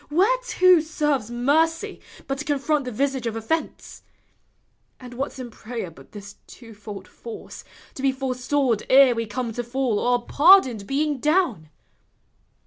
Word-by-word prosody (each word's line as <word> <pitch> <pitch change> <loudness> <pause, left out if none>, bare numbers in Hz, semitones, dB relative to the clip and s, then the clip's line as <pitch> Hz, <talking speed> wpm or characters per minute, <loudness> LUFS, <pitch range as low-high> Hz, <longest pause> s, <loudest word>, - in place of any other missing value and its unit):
Whereto 370 0 +3
serves 295 -7 -1
mercy 300 +7 0 0.2
But 275 0 -4
to 295 - -5
confront 290 0 0
the 250 - -4
visage 265 +1 -1
of 225 - -3
offence? 225 +9 -4 1.0
And 250 -1 -11
what 265 +3 -3
's - - -14
in 250 -2 -7
prayer 220 -5 -7
but 135 -4 -17
this 205 -1 -11
twofold 210 -4 -11
force, 230 -1 -10 0.3
To - - -8
be 270 0 +2
forestalled 260 -2 -1
ere 265 -1 +7
we 230 -1 -3
come 235 +1 -4
to 240 - -3
fall. 240 -3 -1
Or 245 -1 0
pardoned 280 - +5
being 290 0 -1
down? 295 - 0
260 Hz, 145 wpm, -23 LUFS, 230-295 Hz, 1.0 s, ere